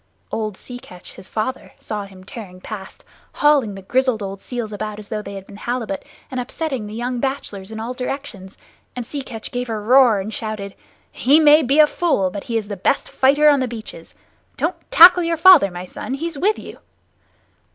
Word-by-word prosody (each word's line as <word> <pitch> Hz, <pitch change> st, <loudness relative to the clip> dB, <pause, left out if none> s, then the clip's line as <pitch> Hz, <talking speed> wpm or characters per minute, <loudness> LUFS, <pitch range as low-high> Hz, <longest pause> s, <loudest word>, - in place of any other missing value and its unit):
Old 215 Hz, -3 st, -3 dB
Sea 245 Hz, -1 st, -9 dB
Catch, 180 Hz, -6 st, -13 dB
his -, -, -12 dB
father, 240 Hz, +4 st, -4 dB
saw 210 Hz, -2 st, -5 dB
him 190 Hz, -1 st, -14 dB
tearing 190 Hz, -3 st, -10 dB
past, 195 Hz, 0 st, -9 dB, 0.3 s
hauling 280 Hz, -9 st, +3 dB
the 195 Hz, -, -10 dB
grizzled 255 Hz, 0 st, +1 dB
old 195 Hz, 0 st, -6 dB
seals 235 Hz, -4 st, -5 dB
about 210 Hz, 0 st, -5 dB
as 210 Hz, -1 st, -10 dB
though 215 Hz, -1 st, -3 dB
they 200 Hz, -1 st, -8 dB
had 195 Hz, -1 st, -8 dB
been 200 Hz, -, -13 dB
halibut, 235 Hz, -3 st, -3 dB, 0.3 s
and 255 Hz, -, -3 dB
upsetting 260 Hz, -2 st, -4 dB
the 210 Hz, -, -8 dB
young 245 Hz, +1 st, -3 dB
bachelors 235 Hz, -8 st, -4 dB
in 220 Hz, -, -6 dB
all 230 Hz, +3 st, -4 dB
directions; 250 Hz, -7 st, -6 dB, 0.4 s
and 245 Hz, -2 st, -4 dB
Sea 285 Hz, +4 st, -5 dB
Catch 225 Hz, -4 st, -8 dB
gave 245 Hz, 0 st, -3 dB
a 225 Hz, -, -2 dB
roar 240 Hz, 0 st, +5 dB
and 210 Hz, +3 st, -5 dB
shouted: 215 Hz, -3 st, -5 dB, 0.4 s
"He 285 Hz, +5 st, +4 dB
may 305 Hz, 0 st, +7 dB
be 275 Hz, +1 st, +1 dB
a 305 Hz, -, +9 dB
fool, 295 Hz, -, 0 dB
but 200 Hz, +1 st, -7 dB
he 230 Hz, -, -1 dB
is 215 Hz, -2 st, -3 dB
the 205 Hz, -, -4 dB
best 190 Hz, -, 0 dB
fighter 285 Hz, +3 st, +3 dB
on 290 Hz, -2 st, +5 dB
the 255 Hz, -, 0 dB
beaches! 225 Hz, -2 st, -9 dB, 0.4 s
Don't -, -, 0 dB, 0.2 s
tackle 355 Hz, +2 st, +9 dB
your 335 Hz, -1 st, 0 dB
father, 340 Hz, -, +7 dB
my 175 Hz, 0 st, -7 dB
son! 260 Hz, +8 st, -5 dB
He's 330 Hz, +3 st, -4 dB
with 400 Hz, +9 st, +1 dB
you!" -, -, -10 dB
230 Hz, 205 wpm, -20 LUFS, 205-275 Hz, 0.4 s, a